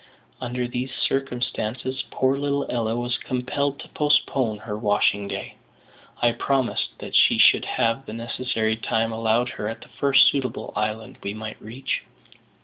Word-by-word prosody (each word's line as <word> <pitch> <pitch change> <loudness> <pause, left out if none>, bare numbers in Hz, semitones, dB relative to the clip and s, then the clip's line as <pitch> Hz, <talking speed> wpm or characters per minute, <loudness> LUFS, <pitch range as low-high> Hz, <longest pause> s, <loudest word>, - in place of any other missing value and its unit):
Under 125 0 -2
these 125 +2 -3
circumstances 130 -1 -2
poor 130 +1 +2
little 140 0 0
Ella 115 -2 0
was 120 +1 -1
compelled 140 +3 -1
to - - -11
postpone 135 -6 +2
her 105 0 -5
washing 105 -1 +2
day, - - -5 0.7
I 120 - +6
promising 130 +1 0
that - - -8
she - - +6
should - - +6
have 115 +4 0
the 110 - -6
necessary 115 -1 -1
time 115 0 0
allowed 115 +2 +1
her 105 - -4
at 115 - -5
the - - -14
first 140 -1 +5
suitable 130 -4 -3
island 110 +1 -3
we 100 +1 -4
might 110 0 -7
reach. 120 +5 -3
120 Hz, 150 wpm, -24 LUFS, 110-130 Hz, 0.7 s, I